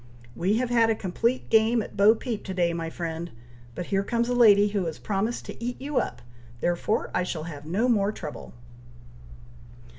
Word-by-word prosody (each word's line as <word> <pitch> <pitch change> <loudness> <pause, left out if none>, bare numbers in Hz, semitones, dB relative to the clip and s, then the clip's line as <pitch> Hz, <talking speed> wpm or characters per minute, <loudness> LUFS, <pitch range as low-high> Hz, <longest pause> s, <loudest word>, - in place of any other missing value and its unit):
"We 195 +5 +1
have 245 0 -1
had 230 -2 +4
a 225 - +2
complete 230 +6 -1
game 225 +1 +4
at - - -11
bo 205 +3 +6
peep 230 -2 -4
to 190 - -5
day, 175 -2 +1
my 165 -1 -3
friend! 165 0 -5 0.5
but 180 - -4
here 195 - +3
comes 235 +3 0
a - - +1
lady 210 -4 +6
who 200 -3 -1
has 160 - -5
promised 215 +4 -2
to - - -8
eat 245 +1 -3
you 280 0 -3
up, 120 - -4 0.4
therefore 175 - 0
I - - +1
shall 175 -3 -3
have 150 -2 -8
no 205 +9 +1
more 210 -4 +2
trouble." 145 - -8
205 Hz, 190 wpm, -26 LUFS, 170-230 Hz, 0.5 s, bo